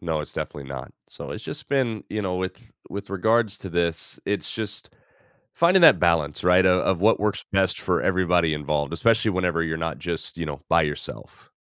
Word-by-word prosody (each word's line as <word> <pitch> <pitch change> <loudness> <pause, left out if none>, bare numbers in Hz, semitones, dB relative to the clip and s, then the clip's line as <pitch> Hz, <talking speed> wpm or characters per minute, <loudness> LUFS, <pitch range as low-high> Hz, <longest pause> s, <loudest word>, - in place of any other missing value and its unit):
No. 80 -2 -2
It's - - -6
definitely 70 -2 -6
not. 65 -2 -7
So - - -7
it's - - -7
just - - -6
been 125 -6 0
you 105 0 -3
know, 90 -1 -2
with 95 0 -6 0.2
with 100 0 -7
regards 110 +2 +1
to 95 - -8
this, 85 -1 -1
it's 105 0 -2
just, 105 -1 -5 0.6
finding 180 +3 +4
that 165 - +8
balance, 80 -4 +1
right, 90 +1 +5
o 90 0 +4
of 95 -3 0
what 110 +1 +4
works 105 -1 -1
best 95 -1 +1
for - - 0
everybody 90 -3 +2
involved, 75 0 -2
especially 115 +5 +2
whenever 90 -3 0
you're 80 -1 -2
not 80 0 -3
just, 85 -1 -3
you 85 - -3
know, 70 -2 -6
by 85 - +4
yourself. 75 -1 -6
90 Hz, 195 wpm, -24 LUFS, 80-105 Hz, 0.6 s, that